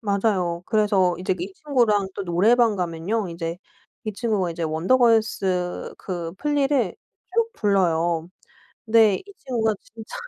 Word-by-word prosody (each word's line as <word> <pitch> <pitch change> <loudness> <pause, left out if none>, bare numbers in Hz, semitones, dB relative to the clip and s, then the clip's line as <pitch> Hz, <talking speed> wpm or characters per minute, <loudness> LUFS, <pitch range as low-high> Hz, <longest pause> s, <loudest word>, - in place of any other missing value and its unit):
맞아요. 195 -5 0
그래서 205 -5 +2
이제 185 0 0
이 190 +3 -5
친구랑 230 -9 +1
또 - - -4
노래방 215 +5 +3
가면요 180 +4 -2
이제 165 0 -4 0.5
이 215 - -3
친구가 205 -5 -1
이제 170 0 -5
원더걸스 190 0 +1
그 170 -3 -5
플리를 280 - +1 0.4
쭉 460 0 +1
불러요. 170 -5 +1 0.6
근데 220 -3 +5
이 405 0 -12
친구가 225 -4 0
진짜 225 0 -12
200 Hz, 275 characters per minute, -23 LUFS, 175-230 Hz, 0.6 s, 근데